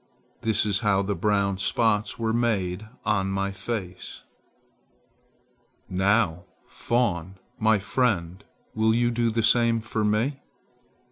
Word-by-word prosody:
This 110 -1 +2
is 100 -2 +2
how 100 -3 +2
the 100 +1 -1
brown 100 0 0
spots 105 +1 +1
were 115 -1 -1
made 110 -4 -1 0.2
on 100 -3 +1
my 100 0 -1
face." 95 -2 -6 1.6
"Now, 95 -2 +1 0.2
fawn, 95 -7 -1 0.2
my 110 0 +4
friend, 100 -4 -1 0.3
will 110 0 +2
you 120 0 +2
do 120 0 +1
the 115 0 -1
same 115 0 +4
for 110 -1 -3
me? 110 +7 0
105 Hz, 120 wpm, -25 LUFS, 95-115 Hz, 1.6 s, my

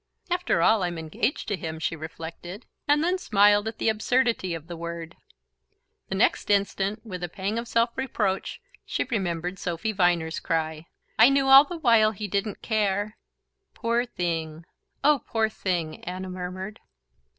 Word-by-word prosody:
"After 355 - +1
all, 220 +2 +4
I'm 175 -2 -2
engaged 160 - -2
to 205 - +1
him," 160 -3 -5
she 160 +1 -2
reflected, 165 +5 -8 0.2
and 295 +1 +4
then 360 +2 +1
smiled 205 - +4
at 225 - -5
the - - -1
absurdity 225 -4 +1
of 160 -2 -8
the 170 0 -7
word. 170 0 -6 0.9
The 195 - -2
next 200 - +2
instant, 200 +1 0
with 180 -5 -6
a 175 - -3
pang 200 +5 -2
of 235 - -6
self 230 0 +2
reproach, 210 -7 -2 0.2
she - - -1
remembered 180 -4 -2
Sophy 175 +6 -2
Viner's 175 -5 +1
cry: 160 -1 -2 0.3
"I 225 +4 +9
knew 275 0 +3
all 270 +2 +9
the 350 +3 -6
while 230 -7 +4
he 210 +1 -5
didn't 200 +1 -2
care..." 210 -1 0 0.6
"Poor 235 +1 +1
thing, 165 -5 -3 0.4
oh 290 -2 +4
poor 220 -1 +1
thing!" 175 -7 -3
Anna 185 +1 -5
murmured... 185 +3 -6
195 Hz, 160 wpm, -26 LUFS, 170-225 Hz, 0.9 s, I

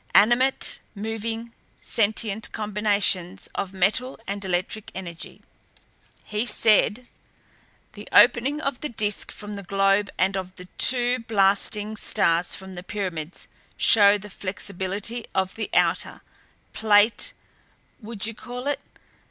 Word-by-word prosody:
Animate, 240 +5 +4 0.2
moving, 225 +2 -5 0.3
sentient 215 0 -1
combinations 200 -3 +1
of 195 - -3
metal 200 +7 0
and 200 0 -4
electric 190 +3 -2
energy." 170 -3 -8 0.8
He 215 +3 -3
said: 225 +2 +2 0.9
"The - - -11
opening 270 +5 +5
of 275 -4 -3
the 300 - -3
Disk 210 -3 -2
from 210 -1 -8
the - - -6
globe 195 +1 +1
and 190 +1 +1
of 185 -1 -5
the 180 - -10
two 245 0 +4
blasting 210 0 +1
stars 175 -5 +1
from 190 -1 -9
the 180 - -7
pyramids 180 -5 -5 0.3
show 205 -2 +6
the 205 0 -11
flexibility 200 +4 -4
of 190 -1 0
the 220 - -5
outer - - +1 0.5
plate 220 - +3 0.7
would 215 -2 -5
you 225 - -4
call 245 +3 -8
it? 290 0 -1
210 Hz, 120 wpm, -24 LUFS, 195-225 Hz, 0.9 s, show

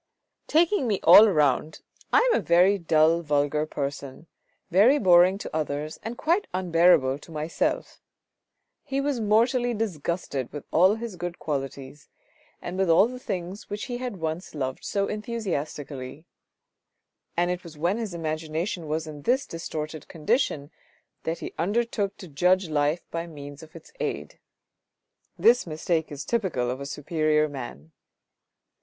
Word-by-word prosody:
" - - -57
Taking 330 -2 +3
me 205 -4 0
all 220 - +9
round 150 -2 +1 0.3
I - - +5
am - - +3
a - - -6
very 180 +4 +4
dull, 165 0 +3
vulgar 150 0 0
person, 140 0 -5 0.5
very 215 - +6
boring 185 -4 +5
to 200 - -7
others 150 0 -3
and 230 +2 -6
quite 345 +6 +1
unbearable 165 -7 +3
to 165 - -15
myself." 155 +1 -2 0.8
He 275 -1 -2
was 275 -2 -1
mortally 235 +3 +2
disgusted 170 - -3
with 145 -1 -7
all 185 +5 +5
his 225 -4 -6
good 175 0 -5
qualities, 135 -1 -5 0.5
and 180 +2 -5
with 190 -2 +2
all 165 +5 +6
the 250 +1 -8
things 185 -2 -5
which 205 +1 -4
he 245 -3 -5
had 250 -4 -4
once 160 +1 -4
loved 130 -2 -3
so 200 -1 0
enthusiastically; 155 - -5 1.1
and 175 +1 +2
it 180 +1 -4
was 165 -3 -12
when 175 +8 0
his 210 -6 -4
imagination 160 +2 -3
was 155 +2 -2
in 150 -2 -9
this 255 - +1
distorted 155 -2 -6
condition 160 - -1 0.5
that 165 +1 -1
he - - -7
undertook 205 +2 -1
to 185 - -10
judge 180 +4 +2
life 150 +2 0
by 170 0 -3
means 145 -3 -10
of 160 0 -15
its - - -13
aid. - - -4 1.0
This 240 -3 +4
mistake 160 0 -1
is 145 0 -6
typical 180 - -1
of 130 +2 -5
a 140 - -5
superior 155 +1 +1
man. 120 - -8
170 Hz, 150 wpm, -26 LUFS, 150-205 Hz, 1.1 s, all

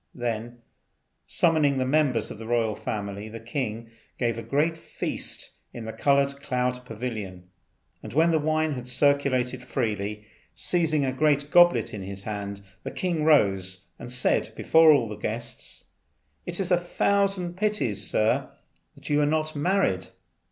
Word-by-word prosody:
Then, 120 0 -4 0.6
summoning 155 -5 +3
the 130 - +1
members 130 -5 +1
of - - -8
the 115 - -8
royal 115 -2 +1
family, 100 0 -5
the 115 +1 -8
king 115 -1 -4 0.3
gave 120 -2 0
a 115 - -5
great 145 +8 +1
feast 165 - -4 0.2
in 115 - -7
the 110 - -5
Coloured 140 0 +2
Cloud 125 -2 -1
pavilion; 105 -6 -6 0.5
and, - - -8
when 160 +5 +4
the 160 - +3
wine 155 +1 +1
had 125 -3 -5
circulated 130 -1 +2
freely, 105 -4 -3 0.3
seizing 160 -5 +1
a 130 - -1
great 145 +1 +1
goblet 175 -10 +5
in 105 - -5
his 95 +1 -6
hand, 100 -1 -5 0.2
the - - -5
king 175 -4 -1
rose 95 - +2
and 120 - -8
said 125 0 +1
before 160 -1 +6
all 130 -6 +3
the 105 - -6
guests, 110 +3 -5 0.6
"It 175 +1 -2
is 190 -1 -1
a 180 - +6
thousand 185 0 0
pities, 185 - -1
Sir, 110 +1 +1 0.5
that - - -14
you 150 0 +2
are 145 - +3
not 155 0 0
married. 150 - +1
125 Hz, 155 wpm, -26 LUFS, 110-155 Hz, 0.6 s, before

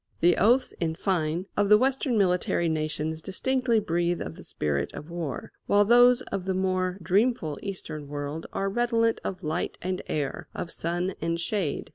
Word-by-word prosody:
The 175 0 +5
oaths, 240 +7 +3
in 160 -2 -1
fine, 170 -1 -1
of 205 -1 +2
the 210 - +8
Western 260 0 +1
military 180 -3 +2
nations 155 0 -2
distinctly 250 +5 +1
breathe 175 -3 0
of 80 - -5
the - - -11
spirit 75 -2 -2
of 150 +3 -8
war, 170 -5 -4 0.2
while 205 0 +5
those 245 +2 +6
of 185 - -2
the 190 -1 0
more 185 -1 0
dreamful 190 - +1
Eastern 155 -7 -6
world 145 +2 -5
are 195 - -1
redolent 230 +1 +1
of 185 - -5
light 155 +3 -2
and 185 0 -3
air, 145 -3 -3
of 165 - -4
sun 175 +3 -1
and 165 0 -1
shade. 170 -3 -2
180 Hz, 170 wpm, -27 LUFS, 160-210 Hz, 0.2 s, the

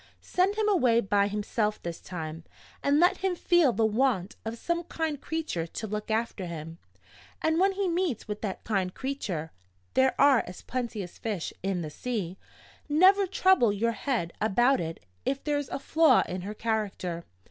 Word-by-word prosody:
Send 375 +3 +1
him 430 0 +1
away 255 - +4
by 200 -2 +2
himself 210 +1 -1
this 170 -1 -6
time; 160 -2 -6 0.4
and 285 +1 +3
let 355 +2 +4
him 375 -1 0
feel 345 -5 +4
the 225 -1 +1
want 220 -4 +1
of 225 +1 -4
some 340 +6 -1
kind 315 -4 -3
creature 310 - -3
to 215 - -6
look 210 +1 -4
after 220 -4 -1
him. 165 0 -7 0.6
And 320 +1 +1
when 390 +1 +4
he 390 0 -1
meets 345 - -1
with 210 0 -5
that 200 -4 -4
kind 190 -4 -1
creature 200 - -3 0.4
(they 265 0 +5
are 280 -4 +5
as 180 - -9
plenty 235 -5 -3
as 175 - -11
fish 210 -7 -3
in 190 -2 -1
the 155 - -6
sea), 195 -4 -4 0.5
never 380 +6 +5
trouble 375 - +4
your 225 +3 +1
head 220 -5 -2
about 240 +5 +3
it 165 0 -6 0.2
if 275 0 -1
there's 290 -2 -1
a - - -2
flaw 320 +3 +4
in 180 0 -4
her 205 +3 -6
character. 205 -6 -2
225 Hz, 175 wpm, -28 LUFS, 190-300 Hz, 0.6 s, they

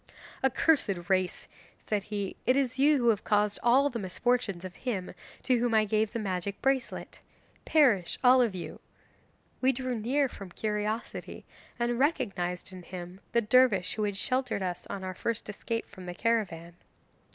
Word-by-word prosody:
'"Accursed 250 - +2
race," 185 -1 0 0.3
said 205 -2 -2
he, 205 -2 -3
"it 255 - +4
is 265 -1 0
you 290 +2 +5
who 240 -3 +3
have 210 -3 +2
caused 210 -1 +1
all 260 +4 +5
the 245 -4 -3
misfortunes 200 -1 -1
of 185 - -8
him 205 -8 -3 0.3
to 250 -2 +2
whom 235 -1 +1
I 215 -1 +5
gave 215 +1 +1
the 235 - -3
magic 200 -2 -3
bracelet. 270 -2 -1 0.5
Perish 245 - +3
all 255 0 +7
of 225 -6 +1
you!" 175 - -6 0.8
'We 265 +1 +4
drew 255 -2 -3
near 270 +6 +1
from 195 -6 -10
curiosity, 215 +1 -3 0.3
and 240 0 0
recognised 190 - -1
in 185 - -8
him 180 +1 -8
the 235 - +4
dervish 215 -4 +4
who 215 - -3
had 205 -2 -1
sheltered 255 -2 -1
us 180 -1 -4
on 195 - -5
our 185 0 -4
first 230 +4 -3
escape 230 +2 -3
from 185 -3 -11
the 175 - -5
caravan. 185 -8 -1
215 Hz, 165 wpm, -29 LUFS, 190-250 Hz, 0.8 s, all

